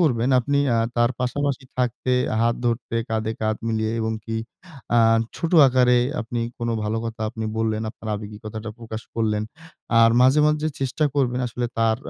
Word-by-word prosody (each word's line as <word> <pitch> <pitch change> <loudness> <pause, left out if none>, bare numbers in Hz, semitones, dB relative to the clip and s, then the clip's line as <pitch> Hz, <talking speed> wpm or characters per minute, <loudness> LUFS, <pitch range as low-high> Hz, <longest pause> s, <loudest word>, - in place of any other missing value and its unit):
করবেন 125 -7 +2
আপনি 140 +4 0 0.2
আ - - +2 0.2
তার 120 +1 +3
পাশাপাশি 140 +1 -1
থাকতে, 125 0 -1 0.3
হাত 115 0 +3
ধরতে, 115 0 -1
কাঁধে 110 0 -1
কাঁধ 110 0 0
মিলিয়ে 110 0 0
এবং 110 0 -1
কি 115 0 -3 0.6
আ - - +6 0.4
ছোট 165 +1 -3
আকারে 125 -1 +4 0.2
আপনি 115 +1 -3 0.2
কোন 120 0 -2 0.2
ভালো 110 +1 -1
কথা 115 -1 -5
আপনি 110 -1 -5
বললেন, 110 -1 0
আপনার 110 -1 -10
আবেগী 105 0 -7
কথাটা 110 +1 -6
প্রকাশ 110 -1 -7
করলেন। 105 -2 0 0.6
আর 115 0 +7
মাঝে, 130 +4 +5
মাঝে 150 +1 +1
চেষ্টা 135 +3 0
করবেন 125 -3 +1
আসলে 120 +1 -3
তার 110 -1 +3
115 Hz, 170 wpm, -23 LUFS, 110-125 Hz, 0.6 s, আর